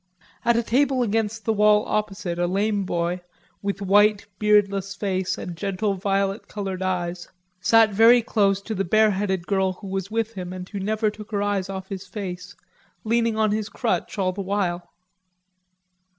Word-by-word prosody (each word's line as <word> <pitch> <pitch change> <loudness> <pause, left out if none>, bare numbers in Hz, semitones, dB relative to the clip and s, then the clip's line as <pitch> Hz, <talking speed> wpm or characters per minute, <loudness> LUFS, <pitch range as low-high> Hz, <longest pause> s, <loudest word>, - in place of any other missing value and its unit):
At 235 0 +3
a 235 - +1
table 260 +2 +2
against 220 -1 -1
the 225 - +2
wall 210 0 +4
opposite 195 -4 -2
a 175 - +1
lame 200 +2 0
boy, 175 0 -1 0.4
with 200 0 -3
white 205 +2 +4
beardless 200 -2 +2
face 190 -2 -1
and 175 - -6
gentle 200 +3 -1
violet 195 +1 -1
colored 195 -3 -5
eyes, 180 -2 -2 0.3
sat 225 +2 +5
very 230 +4 +6
close 200 -4 +1
to 220 - -4
the 195 -2 -1
bareheaded 195 -2 +2
girl 190 -1 +1
who 200 - -13
was 190 0 -3
with 225 0 -1
him 180 -2 -6
and 185 0 -7
who 200 - -6
never 215 +2 0
took 210 0 -11
her 205 -2 -1
eyes 200 -2 -1
off 190 -1 -6
his 195 -1 -6
face, 180 -3 -6 0.5
leaning 230 0 +1
on 215 -1 +2
his 215 0 -2
crutch 225 +1 -2
all 185 -2 +1
the 195 +2 -5
while. 185 -3 -2
200 Hz, 170 wpm, -24 LUFS, 190-215 Hz, 0.5 s, very